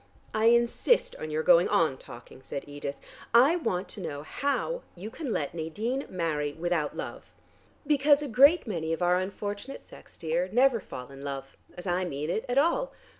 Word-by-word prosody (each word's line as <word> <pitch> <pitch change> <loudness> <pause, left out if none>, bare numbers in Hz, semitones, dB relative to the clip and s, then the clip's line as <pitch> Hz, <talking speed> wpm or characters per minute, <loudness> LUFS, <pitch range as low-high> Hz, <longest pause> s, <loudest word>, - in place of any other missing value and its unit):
"I 215 +1 +1
insist 235 - +3
on 155 - -6
your 155 +1 -1
going 175 0 +6
on 160 -5 +2
talking," 120 +2 -12
said 140 - -6
Edith. 145 -1 -6 0.4
"I 270 +8 +7
want 195 - -1
to 205 - -8
know 145 -4 -5
how 285 - -2
you 200 +5 -8
can 290 -3 -5
let 145 -8 -2
Nadine 210 - -3
marry 155 -5 -1
without 165 -2 -1
love." - - -7 0.5
"Because 290 0 +4
a - - -3
great 280 +8 +6
many 165 -7 -2
of 165 - -2
our 175 +1 +4
unfortunate 205 +6 -5
sex, - - -14
dear, 170 +3 -1
never 250 +1 +4
fall 125 -8 -9
in 135 0 -11
love, 135 -1 -6 0.2
as 180 - -7
I 180 0 0
mean 150 -1 -3
it, 220 - -2
at 245 - 0
all. 340 - +2
180 Hz, 180 wpm, -28 LUFS, 155-245 Hz, 0.5 s, I